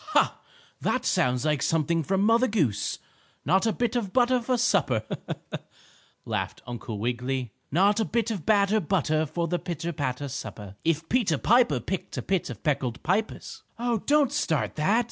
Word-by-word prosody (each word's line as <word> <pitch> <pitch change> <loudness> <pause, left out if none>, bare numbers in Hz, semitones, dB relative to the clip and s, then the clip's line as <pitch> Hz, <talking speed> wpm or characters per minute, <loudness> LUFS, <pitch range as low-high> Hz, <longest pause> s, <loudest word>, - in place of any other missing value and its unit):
"Ha! - - +3 0.4
That - - -1
sounds 125 +2 +1
like 150 -2 +1
something 165 +1 +1
from 195 +5 0
Mother 230 +4 +4
Goose. 130 - 0 0.5
Not 190 - +3
a - - +3
bit 240 +2 -1
of 215 -6 -1
butter 250 +1 +3
for 250 +1 0
supper," 180 - +2 1.2
laughed - - -3
Uncle 120 -2 -6
Wiggily. 125 +2 -2 0.2
"Not 200 +7 +3
a 220 - +2
bit 230 -1 0
of 195 -8 -4
batter 205 +1 +3
butter 155 -4 +1
for 170 +3 -2
the 175 +1 -1
pitter 170 -1 -4
patter 140 -1 -2
supper. 105 -6 -7
If 165 0 0
Peter 215 - +2
Piper 225 - +4
picked 185 - -4
a - - -2
pit 190 -3 0
of 120 -5 -8
peckled 135 -5 -1
pippers 200 +7 -2
" - - -41
"Oh, 235 -1 0
don't 290 +2 +3
start 160 - 0
that!" 195 +9 +2
170 Hz, 170 wpm, -27 LUFS, 135-220 Hz, 1.2 s, Mother